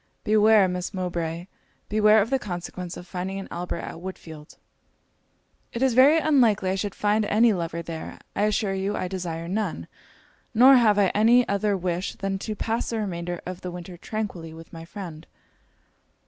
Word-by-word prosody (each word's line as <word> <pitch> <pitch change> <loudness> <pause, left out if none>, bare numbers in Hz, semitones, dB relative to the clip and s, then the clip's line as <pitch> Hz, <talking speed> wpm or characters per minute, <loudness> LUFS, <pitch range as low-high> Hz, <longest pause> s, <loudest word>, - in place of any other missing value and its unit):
Beware, 215 -1 +5
Miss 180 +1 -4
Mowbray 170 -2 -3 0.4
beware 215 0 +5
of 225 - -8
the 270 - +2
consequence 180 -3 -6
of 175 - -9
finding 190 +1 -4
an 195 - -7
Albert 175 0 -4
at - - -7
Woodfield.' 160 -4 -9 1.2
'It 240 - -1
is 265 -2 +3
very 270 +6 +6
unlikely 240 -12 +3
I - - +1
should 195 +1 -3
find 210 +1 +1
any 220 +2 +4
lover 170 -2 -3
there. 165 -1 -7 0.2
I 205 - +2
assure 210 -1 0
you 195 +2 -2
I 185 - -2
desire 170 -3 -4
none; 185 - -3 0.7
nor 255 +4 +8
have 220 -5 +4
I 200 -2 +4
any 235 +5 +4
other 200 0 0
wish 180 +1 -3
than 195 -1 -3
to 215 +2 -4
pass 225 +3 -2
the 230 - -2
remainder 175 -4 -4
of 185 0 -6
the 180 - -5
winter 175 0 -8
tranquilly 175 -4 -5
with 165 0 -13
my 165 0 -8
friend.' 170 -4 -9
190 Hz, 175 wpm, -25 LUFS, 175-215 Hz, 1.2 s, nor